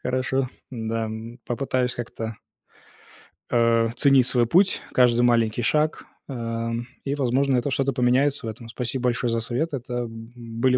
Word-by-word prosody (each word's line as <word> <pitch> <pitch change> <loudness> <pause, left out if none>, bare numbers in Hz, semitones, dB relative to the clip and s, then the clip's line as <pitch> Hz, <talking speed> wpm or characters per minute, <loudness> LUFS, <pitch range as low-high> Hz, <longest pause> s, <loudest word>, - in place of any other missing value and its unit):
Хорошо. 130 +1 0 0.2
Да, 115 -2 -2
м. 110 +2 -7
Попытаюсь 125 0 -1
как-то 115 -2 -5 1.2
а, 115 -1 +3
ценить 135 -3 +5
свой 120 -2 +3
путь, 190 +8 +3
каждый 120 -1 +4
маленький 120 -1 +3
шаг, 150 +6 +1 0.2
ам, 115 -2 -3 0.2
и, 140 +1 -1
возможно, 135 0 +2
это 135 +3 -1
что-то 135 +1 +1
поменяется 130 +2 +2
в - - -2
этом. 115 +1 -9
Спасибо 125 +2 -3
большое 120 -1 +1
за 115 - +1
совет. 145 +8 -2
Это, 125 -2 -5
м, 115 -1 -5
были 120 +2 0
120 Hz, 150 wpm, -24 LUFS, 115-130 Hz, 1.2 s, ценить